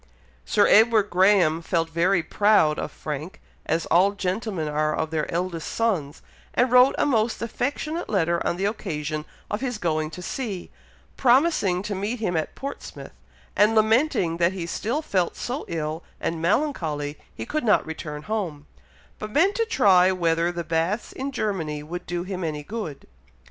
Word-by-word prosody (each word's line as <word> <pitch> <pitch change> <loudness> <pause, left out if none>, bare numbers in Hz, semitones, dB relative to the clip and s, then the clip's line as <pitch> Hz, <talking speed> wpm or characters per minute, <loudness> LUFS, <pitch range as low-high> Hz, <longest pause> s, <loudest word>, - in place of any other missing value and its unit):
Sir 205 - +3
Edward 220 -1 +5
Graham 180 -3 +4
felt 165 -1 0
very 175 +2 +2
proud 205 -8 +3
of - - -4
Frank, 155 +4 -6 0.3
as 165 +1 0
all 190 +4 +4
gentlemen 190 -3 -2
are 155 +1 0
of 160 0 -2
their 155 -2 -2
eldest 170 -1 -2
sons, 180 -11 -1 0.3
and 250 0 +3
wrote 250 +2 +6
a - - +2
most 230 -4 +1
affectionate 285 +8 -3
letter 170 -4 +1
on 170 - -1
the 195 - -1
occasion 155 -8 -3 0.3
of 210 - -2
his 250 -4 -2
going 155 -5 -1
to 180 +2 -9
sea, 205 -5 -5 0.5
promising 245 - +3
to 205 - -3
meet 205 +5 -3
him 195 -6 -1
at 160 - -2
Portsmouth, 275 +1 -8 0.4
and 210 +2 +4
lamenting 220 - +2
that 170 +2 +2
he 180 -3 -4
still 240 - -2
felt 185 - 0
so 255 +5 -4
ill 160 0 -3 0.2
and 165 -1 -2
melancholy 165 - 0 0.2
he - - -5
could 310 -2 -2
not 220 - +3
return 150 -2 -6
home, 175 -9 -3 0.5
but 215 - -5
meant 340 - +3
to 455 +2 0
try 190 - +5
whether 170 -1 +1
the 170 -1 -4
baths 165 +7 -1
in 270 +1 -4
Germany 165 - -2
would 175 +3 -7
do 175 0 -2
him 185 -1 -5
any 150 -2 -3
good. 200 -6 -6
185 Hz, 165 wpm, -24 LUFS, 165-220 Hz, 0.5 s, wrote